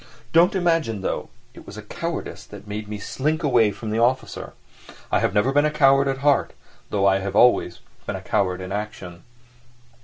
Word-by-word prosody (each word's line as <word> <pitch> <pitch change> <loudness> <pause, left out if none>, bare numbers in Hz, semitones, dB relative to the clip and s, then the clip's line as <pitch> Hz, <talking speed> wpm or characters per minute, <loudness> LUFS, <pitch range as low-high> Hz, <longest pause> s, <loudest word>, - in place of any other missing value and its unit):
Don't 170 +4 +5
imagine, 165 - 0
though, - - -3 0.2
it - - -14
was - - -10
cowardice - - -5 0.2
made 105 +1 -6
me 105 0 -5
slink 155 +10 -2
away 120 -7 +4
from 105 +2 -6
the 110 - 0
officer; 125 +3 -1 0.6
I - - +2
never 105 - +2
have 135 - 0
been 145 +1 +4
a 150 - +2
coward 135 -2 +4
at 135 -1 -1
heart, 145 -2 +3 0.4
though 100 -1 0
I 95 0 +4
have 100 0 -4
always 105 -7 +3 0.3
been - - -2
a - - -6
coward 90 -1 -1
in 95 - -7
action. 100 -4 -6
115 Hz, 180 wpm, -23 LUFS, 100-140 Hz, 0.6 s, Don't